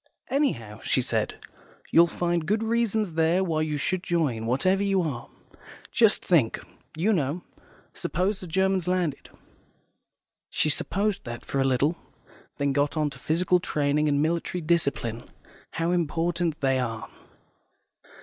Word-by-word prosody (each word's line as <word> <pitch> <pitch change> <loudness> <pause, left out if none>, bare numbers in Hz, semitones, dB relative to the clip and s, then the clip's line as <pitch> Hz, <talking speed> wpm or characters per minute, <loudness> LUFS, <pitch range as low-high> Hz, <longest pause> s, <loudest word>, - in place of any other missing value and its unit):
"Anyhow," 175 - 0
she - - +1
said, - - -1 0.6
"you'll 170 +1 +7
find 170 -2 -1
good 215 +3 +1
reasons 220 -4 0
there 165 +3 +2
why 160 -4 0
you 155 -1 -1
should 185 +6 -1
join, 155 -12 0
whatever 185 +11 +2
you 195 -2 +2
are. 135 -7 -4 0.6
Just 225 -3 +3
think, 150 -11 +3 0.4
you 205 +7 +2
know, 155 0 -1 0.5
suppose 190 +3 -1
the 185 - -8
Germans 190 +1 +1
landed." 180 -5 -1 1.2
She 155 - +2
supposed 200 +5 -1
that 120 0 -7
for 135 - -2
a - - +4
little, 135 +5 +2 0.6
then 140 -1 +1
got 145 +3 +1
on 150 -1 +1
to 125 - -11
physical 180 +5 +2
training 150 -2 +1
and 145 0 +2
military 170 +2 -1
discipline, 140 -8 0 0.5
how 165 +1 0
important 170 -1 0
they 135 -1 +2
are. 115 -3 -3
165 Hz, 140 wpm, -26 LUFS, 145-185 Hz, 1.2 s, you'll